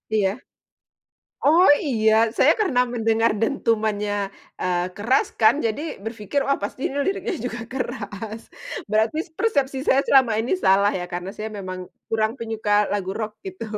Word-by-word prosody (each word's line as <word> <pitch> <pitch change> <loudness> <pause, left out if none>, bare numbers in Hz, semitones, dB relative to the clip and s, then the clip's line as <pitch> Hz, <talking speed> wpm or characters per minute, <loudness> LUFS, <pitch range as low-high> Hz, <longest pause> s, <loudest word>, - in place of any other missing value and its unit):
Iya, 195 -3 +3 1.2
oh 330 +6 +6 0.2
iya 220 -4 +2 0.2
saya - - +6
karena 310 -12 +2
mendengar 225 -1 +2
dentumannya, 215 -4 0 0.5
eee, 180 -1 0
keras 230 +6 +2
kan 220 - +6
jadi 225 +6 -2 0.2
berpikir, 225 +4 -2
"Wah 275 - +1
pasti 235 - -6
ini 280 - -6
liriknya 395 +1 -1
juga 240 0 -5
keras," 220 -3 -5 0.5
berarti 220 +7 +2 0.2
persepsi 280 - +1
saya 270 - +4
selama 260 -4 +5
ini 240 - -2
salah 200 +2 +5
ya 180 - -4
karena 180 +2 -4
saya 215 +1 -4
memang 185 -1 -6 0.3
kurang 220 0 +1
penyuka 220 -2 -3 0.2
lagu 195 -2 -2
rock 215 -1 -3
gitu. 375 -10 -6
225 Hz, 145 wpm, -23 LUFS, 205-265 Hz, 1.2 s, oh